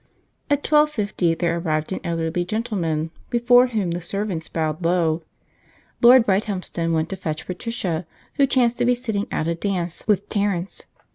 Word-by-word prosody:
At 290 0 +1
twelve 300 0 +4
fifty 200 - 0
there 170 0 0
arrived 155 -1 -1
an - - -3
elderly 165 +1 -1
gentleman, 175 -6 -2 0.2
before 245 +1 +5
whom 210 -8 -1
the 175 +1 -3
servants 185 -2 -3
bowed 160 +1 -2
low. 165 -1 +1 0.8
Lord 245 0 +8
Brighthelmston 190 -4 -1
went 160 0 0
to 195 - -3
fetch 155 -4 -4
Patricia, 180 -4 -3 0.3
who 280 -2 +4
chanced 245 -2 +2
to 245 - +2
be 245 0 +3
sitting 220 -5 -3
out 155 - -1
a 170 - +1
dance 175 -1 -3
with 205 -2 +2
Terence. 200 -3 -2
185 Hz, 160 wpm, -22 LUFS, 165-230 Hz, 0.8 s, Lord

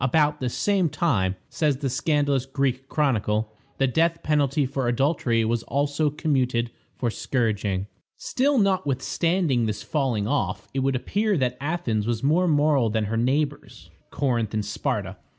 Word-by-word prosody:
"About 150 +2 +2
the 125 - -1
same 190 +5 +1
time," 100 - +1
says 150 -4 0
the 140 0 -2
scandalous 140 -1 +1
Greek 135 -1 -1
chronicle, 110 -7 0 0.3
"the 135 - +3
death 165 +6 +1
penalty 145 -1 +2
for 130 -1 -2
adultery 120 -3 +1
was 115 +1 0
also 145 +4 0
commuted 130 -6 0 0.2
for 120 -3 -1
scourging." 105 -6 -1 0.3
Still, 280 +2 +1
notwithstanding 165 - +1
this 105 -1 -3
falling 125 -9 -1
off, 145 +4 -1
it 135 - -1
would 135 0 +1
appear 205 - 0
that 125 -3 0
Athens 140 -9 -1
was 120 0 -1
more 165 +6 +3
moral 145 -6 +3
than 110 0 0
her 105 +2 -2
neighbors, 130 - -2 0.2
Corinth 120 -6 -1
and 105 -1 -1
Sparta. 105 - -3
135 Hz, 150 wpm, -25 LUFS, 115-150 Hz, 0.3 s, the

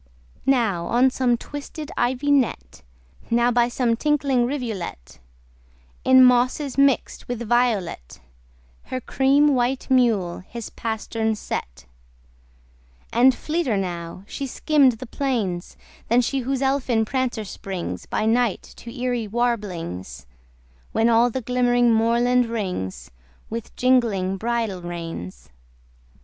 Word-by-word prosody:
Now 225 -10 +2
on 255 +2 +3
some 250 -2 +1
twisted 290 +3 -8
ivy 260 +4 0
net, 220 - 0 0.5
Now 240 +1 +3
by 240 0 +3
some 240 -1 0
tinkling 275 -2 +1
rivulet, 220 - -5 0.8
In 260 0 +7
mosses 250 +2 +2
mixt 275 -1 +1
with 240 -2 -4
violet 220 - 0 0.7
Her 255 - -4
cream 275 +3 +3
white 255 +1 -1
mule 225 -9 +2
his 225 +4 -8
pastern 220 0 -2
set: 60 - -6 1.3
And 250 +2 +5
fleeter 310 -9 -1
now 175 -1 -4
she 275 +6 -5
skimm'd 280 -1 +3
the 230 +3 -8
plains 225 -10 -2 0.3
Than 240 +2 +4
she 270 +3 -1
whose 265 +1 -2
elfin 260 -4 +1
prancer 245 -3 -2
springs 180 - -6
By 215 - -1
night 230 -2 +1
to 235 - -10
eery 245 -2 -2
warblings, 180 - -3 0.7
When 225 +1 +3
all 235 +1 +4
the 260 +2 -3
glimmering 245 0 +2
moorland 235 +2 +3
rings 180 - -4 0.4
With 230 0 -6
jingling 225 -7 +2
bridle 225 -3 -2
reins. 165 - -7
235 Hz, 115 wpm, -23 LUFS, 200-255 Hz, 1.3 s, In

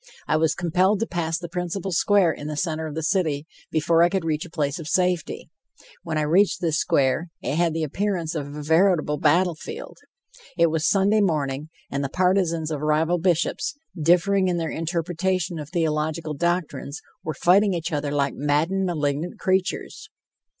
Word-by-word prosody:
I 155 - +2
was 160 0 +2
compelled 185 +4 +2
to - - +2
pass 165 -5 -2
the 175 0 -6
principal 180 +2 -3
square 185 0 +3
in 145 -1 -7
the 150 -1 -4
center 160 -2 -2
of 155 - -7
the 160 - -3
city 155 -4 0 0.2
before 165 +1 +2
I 170 - +5
could 190 -2 -1
reach 155 -1 -1
a - - -11
place 145 -3 -2
of 160 - -7
safety. 180 -1 -1 0.5
When 160 -2 -3
I 155 - +1
reached 180 +7 +3
this 165 -3 0
square, 140 +5 +1 0.2
it - - -1
had 165 -1 +1
the 165 - -1
appearance 175 +1 -2
of 150 -4 -3
a 150 +1 -7
veritable 160 -2 +2
battlefield. 175 - 0 0.6
It 170 -1 +4
was 160 0 +1
Sunday 205 +2 +3
morning, 150 -5 -1 0.2
and 140 +1 -1
the 135 - -2
partisans 180 -2 +1
of 150 -2 -3
rival 160 +3 +1
bishops, 180 - 0 0.2
differing 180 +4 +3
in 180 -1 0
their 165 -2 -2
interpretation 170 +1 -2
of 150 -1 -7
theological 160 -2 -1
doctrines, 170 -2 -2 0.2
were 155 - -4
fighting 195 +2 +4
each 170 +1 -3
other 145 -1 -1
like 140 -1 0
maddened, 160 +7 +1
malignant 150 0 -2
creatures. 190 0 -1
165 Hz, 175 wpm, -24 LUFS, 155-180 Hz, 0.6 s, I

